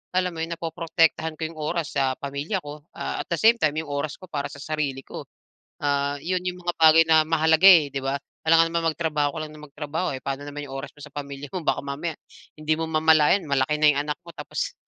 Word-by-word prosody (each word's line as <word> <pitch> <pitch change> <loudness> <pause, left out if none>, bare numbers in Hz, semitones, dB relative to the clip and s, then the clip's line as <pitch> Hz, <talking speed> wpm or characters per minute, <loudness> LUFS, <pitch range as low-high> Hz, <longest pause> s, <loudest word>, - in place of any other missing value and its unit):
alam 180 -1 +1
mo 165 - -8
yun, 165 +1 -3
napoprotektahan 165 -1 0
ko 160 - -6
'yong 160 0 -5
oras 160 +1 -2
sa 135 -2 0
pamilya 145 +7 -4
ko, 145 +2 -10
ah, - - -4
at - - -5
the 170 - 0
same 230 +6 +4
time 155 -1 +1
'yong 155 -2 -4
oras 145 +1 -2
ko 185 -1 -15
para 145 -1 -2
sa 145 -1 -10
sarili 145 -4 -3
ko. - - -9 0.5
Ah, 140 0 0
yun 180 +1 -1
yung 180 0 -2
mga 175 0 -1
bagay 160 0 +7
na 160 -1 +7
mahalaga, 160 +2 +3
eh, 160 -6 +7
'di 135 - -3
ba? 135 +1 -1 0.3
Alangan 165 +1 +6
naman 165 -1 +1
magtrabaho 150 -3 -1
ka - - -3
lang 155 - -8
na 150 - -13
magtrabaho, 150 +4 -4
eh, 130 - -8
pa'no 135 0 -3
naman 145 0 -6
'yong 135 - -10
oras 135 +1 -5
mo 145 - -16
sa 150 - -16
pamilya 140 -1 -7
mo? 185 - -3
Baka - - 0
mamaya 150 +3 -4 0.4
hindi 155 +1 0
mo 165 - -1
mamalayan 160 +3 +4
malaki 140 +1 +1
na 155 - +2
'yong 140 - -1
anak 150 - -2
mo 170 - -10
tapos - - -4
155 Hz, 240 wpm, -24 LUFS, 145-165 Hz, 0.5 s, bagay